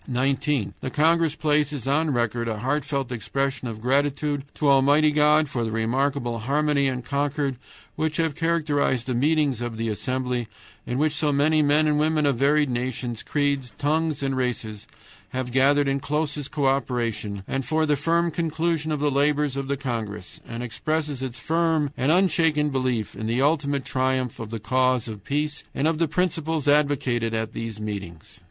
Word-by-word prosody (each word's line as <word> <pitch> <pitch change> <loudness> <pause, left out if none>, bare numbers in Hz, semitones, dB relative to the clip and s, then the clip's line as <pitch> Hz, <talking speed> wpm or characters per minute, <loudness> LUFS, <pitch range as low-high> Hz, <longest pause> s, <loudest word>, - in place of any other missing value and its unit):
"19. 135 -1 0
The - - -4
congress 160 +2 +2
places 150 -4 0
on 155 +4 +1
record 120 -1 0
a 110 -2 -2
heartfelt 135 +2 -2
expression 130 +3 -2
of 110 -2 -6
gratitude 140 +3 0
to 150 - 0
Almighty 140 +3 +5
God 150 +1 +4
for 120 -3 -2
the 115 - -2
remarkable 120 +2 0
harmony 140 +3 +1
and 125 -2 -3
concord 140 0 -1 0.4
which 155 0 -1
have 160 -2 +1
characterized 150 -6 0
the 130 - -2
meetings 145 -1 +1
of 120 -2 -4
the 115 0 -1
assembly, 125 +1 -2 0.4
in 125 - -2
which 150 +1 +2
so 150 0 +1
many 155 +2 +3
men 150 +1 +3
and 150 -1 +2
women 155 0 +2
of 140 -4 +2
varied 145 +3 +3
nations, 120 -1 -3
creeds, 140 -5 -1
tongues, 155 0 0
and 135 -1 0
races 115 -5 -3 0.5
have 130 -1 -3
gathered 140 +3 +3
in 135 0 +1
closest 150 0 -2
co 140 0 -1
operation, 120 -7 -1
and 135 0 -2
for 155 +3 +1
the 165 +4 +1
conclusion 160 -1 -1
of 150 - -1
the 145 -1 +2
labors 145 0 +1
of 140 -1 -3
the 140 0 -1
congress; 110 -7 -5
and 115 +1 -5
expresses 150 +3 -2
its 130 -2 -4
firm 160 -3 +1
and 135 +2 +1
unshaken 165 -5 +3
belief 130 -5 -1
in 110 - -5
the 115 +2 0
ultimate 140 -1 +1
triumph 130 -2 -1
of 115 -2 -6
the 115 0 -5
cause 130 +1 +1
of 105 -3 -8
peace 150 +1 -2
and 145 - +1
of 160 -1 0
the 165 - +2
principles 160 -2 -1
advocated 135 -6 +2
at 110 0 -3
these 115 -2 -5
meetings." 100 -3 -7
140 Hz, 175 wpm, -24 LUFS, 125-150 Hz, 0.5 s, Almighty